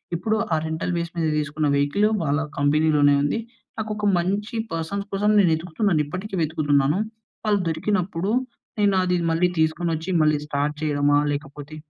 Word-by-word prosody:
ఇప్పుడు 215 +6 0 0.2
ఆ - - +4
rental 160 +3 -2
base 170 0 -3
మీద 165 -1 +1
తీసుకున్న 150 0 -1
వెహికలు 145 +10 +2
వాళ్ళ 145 0 +1 0.2
కంపెనీలోనే 145 0 +3
ఉంది. 145 +10 0 0.4
నాకొక 215 -1 -2
మంచి 200 +6 -1 0.2
పర్సన్స్ 200 +5 -3
కోసం 205 +2 +2
నేనెతుకుతున్నానిప్పటికి 180 +1 0
వెతుకుతున్నాను. 150 0 +1 0.5
వాళ్ళు 205 -2 +2
దొరికినప్పుడు, 180 +2 -1 0.5
నేనది 185 -3 +2
మళ్ళీ 180 +2 +2
తీసుకొనొచ్చి 160 +1 0
మళ్ళీ 155 -1 +3
స్టార్ట్ 145 +1 -1
చేయడమా? 145 -1 +2
లేకపోతే 145 +1 -6
160 Hz, 125 wpm, -23 LUFS, 150-195 Hz, 0.5 s, ఆ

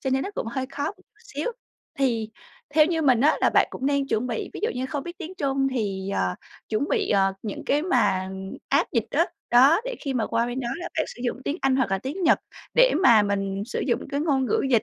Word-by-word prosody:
Cho 265 - -2
nên 265 +1 +1
nó 400 - -4
cũng - - -3
hơi 260 +3 -3
khó 285 +1 -4
một 390 - -2
chút 375 - -23 0.4
xíu. 485 - -1 0.5
Thì 230 -5 0 0.4
theo 305 -1 +7
như 330 -2 0
mình 255 -5 +4
á, 300 +3 +4
là - - +4
bạn - - +4
cũng 265 - -4
nên 280 -1 +1
chuẩn 240 -1 0
bị 235 -3 -3
ví - - -6
dụ 445 - +2
như 255 +1 -2
không 280 +1 -3
biết 345 +3 -8
tiếng 360 +1 -7
Trung 270 -4 0
thì, 195 -5 -2
ờ, 90 -1 0 0.3
chuẩn 220 +7 -1
bị, 435 -5 0
ờ, 195 -1 +3
những 210 -3 -5
cái 290 +2 +2
mà 190 - +1 0.4
app 280 - +2
dịch 230 -4 +1
á. 330 +5 +2 0.2
Đó, 270 - +6
để - - -3
khi 275 -3 -3
mà 225 -3 0
qua 230 +1 0
bên 245 +2 -3
đó 240 - -3
là 350 +1 -5
bạn 315 - +2
sử 240 - -10
dụng 250 +1 -2
tiếng 290 - -1
Anh 265 -1 +2
hoặc 255 -7 +1
là 195 - +1
tiếng 290 - -5
Nhật 325 - +5 0.4
để - - +6
mà 225 - +7
mình 195 -1 -1
sử - - -3
dụng 240 - +1
cái 280 +1 -1
ngôn 280 -4 +1
ngữ - - +1
dịch 230 -3 +4
265 Hz, 260 wpm, -25 LUFS, 225-305 Hz, 0.5 s, theo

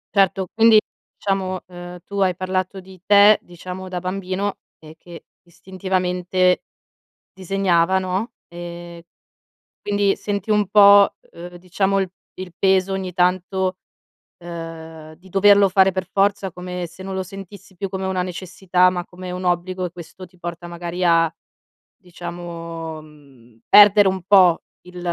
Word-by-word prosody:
Certo, 195 -1 +2
quindi, 225 -1 +6 0.4
diciamo, 190 -2 -2
ehm, 175 0 -10
tu 200 0 -5
hai 185 -2 +2
parlato 185 +1 -3
di 185 -1 -15
te, 205 +1 +6
diciamo 180 +2 -9
da 180 -1 -4
bambino, 190 +2 -3 0.2
e 155 0 -14
che 170 +1 -13 0.2
istintivamente 180 +1 -1 0.7
disegnava, 190 -1 +1
no. 185 +5 -3 0.2
Ehm, 170 0 -9 0.8
quindi 205 -1 0
senti 205 0 -3
un 210 -1 +2
po', 200 0 +6 0.2
uhm, 175 +1 -11
diciamo 190 +2 -1
il 190 - -3 0.3
il 185 -1 -7
peso 190 0 +2
ogni 190 -1 -4
tanto, 185 +1 0 0.6
ehm, 165 -2 -9
di 185 +3 -19
doverlo 200 +1 +5
fare 190 0 +3
per 185 -1 -3
forza, 195 -1 +1
come 180 0 -6
se 180 +3 -13
non 190 0 -5
lo 190 - -2
sentissi 195 0 -12
più 195 - -3
come 190 0 -5
una 185 -1 -1
necessità, 180 0 0
ma 180 -1 -4
come 180 0 -9
un 180 0 -5
obbligo 180 +1 -1
e 175 - -5
questo 175 +2 -11
ti 180 0 -23
porta 175 0 -7
magari 175 +1 -4
a, 165 -1 +3 0.6
diciamo, 170 -3 -8
mhmm, 135 -7 -20
perdere 205 -1 +7
un 190 -1 -2
po' 185 -4 +5 0.2
il 180 0 -10
185 Hz, 145 wpm, -21 LUFS, 175-195 Hz, 0.8 s, perdere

